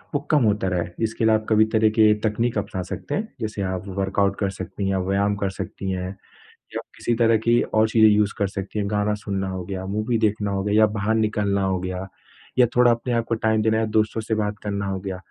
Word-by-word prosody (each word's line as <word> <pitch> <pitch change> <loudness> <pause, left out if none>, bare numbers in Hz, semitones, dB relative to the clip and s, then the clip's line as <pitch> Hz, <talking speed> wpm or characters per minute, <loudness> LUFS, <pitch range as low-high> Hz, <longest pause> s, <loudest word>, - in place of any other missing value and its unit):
वो - - +3
कम 150 -4 +4
होता 105 -3 +1
रहे। 90 -2 -1 0.2
इसके 110 0 -1
लिए 110 - +5
आप 110 - -2
कभी 110 0 +5
तरह 110 0 +4
की 110 -1 +6
तकनीक 115 +2 0
अपना 100 -2 -3
सकते - - -4
हैं 220 +2 -4
जैसे 110 -2 -3
आप 90 - -4
वर्कआउट 100 0 +1
कर 100 -2 0
सकती 95 +1 -5
हैं, 95 - +1
व्यायाम 100 +1 +1
कर 100 -1 -1
सकती 95 0 -5
हैं 90 -1 -3 0.7
या - - -2 0.2
किसी 120 - -1
तरह 115 -1 +4
की 120 +1 +5
और 110 0 +2
चीज़ें 110 -1 +5
यूज़ 105 0 +2
कर 100 - +2
सकती 100 +2 -5
हैं। 100 -1 -1
गाना 105 0 +1
सुनना 95 -1 -2
हो 95 -1 -4
गया, 95 +1 -5
मूवी 110 +4 -1
देखना 105 -1 -1
हो 95 -1 -1
गया 105 0 0
या 110 - +7
बाहर 105 +3 +1
निकलना 105 -2 +1
हो 95 -1 0
गया, 95 +1 -4 0.5
या 125 - +7
थोड़ा 125 0 +6
अपने 120 +1 -1
आप 115 -1 +1
को 115 - +1
टाइम 110 -1 +1
देना 110 0 +2
है 110 - +1
दोस्तों 110 +1 +1
से 110 0 -2
बात 105 -1 -2
करना 100 -1 -3
हो 95 -1 -3
गया। 95 -1 -5
105 Hz, 240 wpm, -23 LUFS, 100-110 Hz, 0.7 s, या